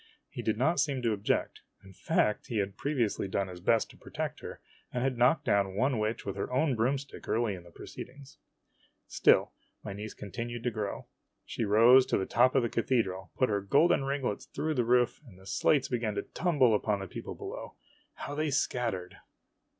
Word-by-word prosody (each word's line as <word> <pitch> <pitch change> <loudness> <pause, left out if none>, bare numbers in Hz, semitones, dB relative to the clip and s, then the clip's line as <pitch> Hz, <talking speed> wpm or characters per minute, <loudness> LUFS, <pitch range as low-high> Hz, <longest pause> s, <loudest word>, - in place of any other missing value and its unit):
He - - -5
did 110 -1 -1
not 155 +7 +2
seem 135 -3 0
to 115 -2 +2
object. 100 -1 -1 0.2
In 95 0 -14
fact, 105 +3 0
he 115 - -3
had 100 -1 -1
pre 145 +7 -3
viously 110 -6 0
done 95 0 -1
his 90 -1 -9
best 110 +5 +2
to - - -18
protect - - -5
her, - - -8 0.3
and 125 - -2
had 135 -1 0
knocked 125 +6 +3
down 100 -4 +1
one 125 +2 +1
witch 110 +1 -2
with 100 -1 -3
her 100 - -3
own 135 +2 +2
broomstick 135 +5 -2
early 115 -2 +1
in 90 - -8
the 85 - -16
proceedings. 135 +10 -11 0.7
Still - - +3 0.3
my 100 - -5
niece 105 +2 -7
continued 115 +4 -6
to 125 - 0
grow. 105 -3 -4 0.4
She 115 - -3
rose 115 +5 +6
to - - +1
the 95 - -1
top 125 +6 +3
of 135 - +4
the - - +1
cathedral, 110 -7 -1
put 130 - +2
her 100 -1 0
golden 140 - +3
ringlets 135 -6 -2
through 155 +1 -2
the 125 -4 +1
roof, 125 +2 +2
and 95 -6 -15
the 95 - -17
slates 135 +8 +2
began 115 -4 -1
to 100 - -2
tumble 145 -10 +2
upon 105 -1 +1
the 95 - -6
people - - -7
below. - - -7 0.4
How 145 - -6
they 155 +1 -1
scattered 115 -9 -1
115 Hz, 200 wpm, -30 LUFS, 100-130 Hz, 0.7 s, rose